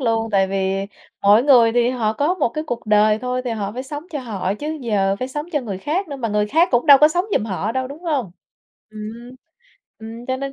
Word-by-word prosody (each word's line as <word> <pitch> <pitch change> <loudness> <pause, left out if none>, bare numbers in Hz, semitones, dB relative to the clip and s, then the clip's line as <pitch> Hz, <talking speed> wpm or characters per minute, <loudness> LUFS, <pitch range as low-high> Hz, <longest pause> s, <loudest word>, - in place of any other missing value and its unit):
luôn, 225 -2 0
tại 195 -2 +3
vì 195 0 -1 0.4
mỗi 205 +3 +6
người 245 -5 +5
thì 240 +1 +2
họ 225 -4 -1
có 290 +10 0
một 370 - 0
cái 305 +7 -5
cuộc 240 -7 -5
đời 210 0 +4
thôi 250 +1 -3
thì 245 - -2
họ 205 -3 -3
phải 250 +3 -5
sống 290 +2 -7
cho 300 - -4
họ 200 -6 -3
chứ, 305 +7 -5
giờ 200 -5 0
phải 255 - -3
sống 295 +3 -5
cho 295 - +1
người 205 -7 -5
khác 330 - -2
nữa 285 - -6
mà 240 -4 -3
người 210 0 0
khác 325 +10 +3
cũng 245 +4 +1
đâu 280 -1 +9
có 300 - +7
sống 350 +4 0
giùm - - -1
họ 210 +1 -3
đâu, 260 0 -2
đúng 290 +5 -10
hông? 285 - -1 0.6
Ừm. 215 0 -10 1.0
Ừm, 230 +2 -9
cho 260 0 -1
nên 275 +1 -5
240 Hz, 245 wpm, -20 LUFS, 210-280 Hz, 1.0 s, đâu